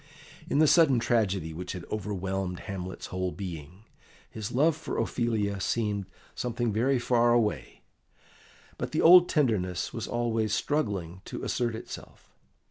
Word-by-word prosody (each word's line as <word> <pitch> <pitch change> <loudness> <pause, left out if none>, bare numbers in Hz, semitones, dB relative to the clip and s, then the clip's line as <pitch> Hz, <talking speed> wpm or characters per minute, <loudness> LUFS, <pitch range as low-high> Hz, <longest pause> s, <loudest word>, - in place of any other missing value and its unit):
In - - +1
the 155 - +6
sudden 155 -4 +5
tragedy 100 -8 0
which 90 +2 -5
had 90 -3 -7
overwhelmed 95 -3 -3
Hamlet's 95 -2 -6
whole 90 0 -1
being, 90 0 -8 0.5
his 110 -2 -5
love 150 +5 +3
for 155 - -5
Ophelia 105 -5 -1
seemed 105 0 -1 0.3
something 120 -2 -2
very 130 +5 +2
far 120 -1 +3
away, 115 -3 -1 1.0
but - - -4
the - - +1
old 175 +1 +8
tenderness 100 - 0
was - - -4
always 115 -3 0
struggling 95 - -2
to - - -6
assert 120 -2 -1
itself. - - -10
110 Hz, 135 wpm, -28 LUFS, 95-120 Hz, 1.0 s, old